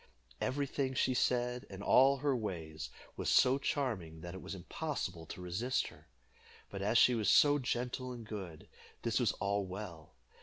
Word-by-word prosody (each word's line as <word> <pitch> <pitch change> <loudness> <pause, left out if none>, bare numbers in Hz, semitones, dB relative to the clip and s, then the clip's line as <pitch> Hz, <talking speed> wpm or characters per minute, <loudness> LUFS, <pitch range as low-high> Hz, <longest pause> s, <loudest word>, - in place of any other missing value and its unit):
Every 140 +2 0
thing 135 -1 -2
she 130 - +2
said, 125 0 0
and 95 0 -8
all 135 +4 +6
her 140 0 +1
ways, 80 -9 -4 0.3
was - - -2
so 130 +2 +5
charming 95 - -2
that 85 +1 -7
it 95 - -7
was - - -6
impossible 95 - -4
to 90 - -8
resist 90 +9 -1
her; - - -18 0.6
but 100 - -5
as 105 +4 +2
she 125 - +7
was 110 -4 +1
so 145 0 +6
gentle 125 0 -2
and 120 -2 -7
good, 95 -8 -7 0.4
this - - +1
was - - +3
all 100 0 0
well. 90 -6 -8
115 Hz, 175 wpm, -34 LUFS, 90-130 Hz, 0.6 s, she